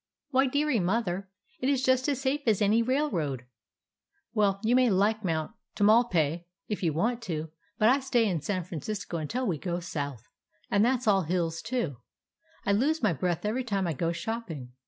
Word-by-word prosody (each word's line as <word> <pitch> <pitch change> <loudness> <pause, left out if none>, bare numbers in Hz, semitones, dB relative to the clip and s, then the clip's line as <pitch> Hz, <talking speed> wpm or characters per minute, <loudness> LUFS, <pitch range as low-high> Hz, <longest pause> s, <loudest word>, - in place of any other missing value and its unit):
"Why, 270 0 +4
dearie, 285 -2 +1
Mother, 195 0 -1 0.3
it 260 - 0
is 270 -2 +1
just 260 +1 +3
as 275 -3 0
safe 275 +2 0
as 215 -3 +4
any 215 +2 +3
railroad." 200 - -1 0.9
"Well, 200 -3 +2
you 230 +3 +3
may 255 -1 +5
like 210 +3 +2
Mount 160 -4 -1 0.2
Tamalpais 195 -7 +3 0.2
if 210 - -3
you 170 -4 +2
want 230 +10 0
to, 160 -3 -4 0.3
but 215 - +4
I 260 +4 +5
stay 245 -4 +2
in 175 -6 -1
San 185 +3 -2
Francisco 175 +2 -5
until 240 - -2
we 175 -9 -1
go 175 +1 -2
south. 145 -8 -5 0.4
And 200 +1 +4
that 250 +1 +2
's - - -6
all 195 -2 +5
hills, 165 -1 -1
too. 230 - -2 0.7
I - - +2
lose 285 +9 +1
my 205 -5 +3
breath 175 +4 -2
every 235 +5 0
time 200 -5 -1
I 170 - 0
go 165 +3 -1
shopping. 170 - -5
205 Hz, 185 wpm, -28 LUFS, 170-245 Hz, 0.9 s, may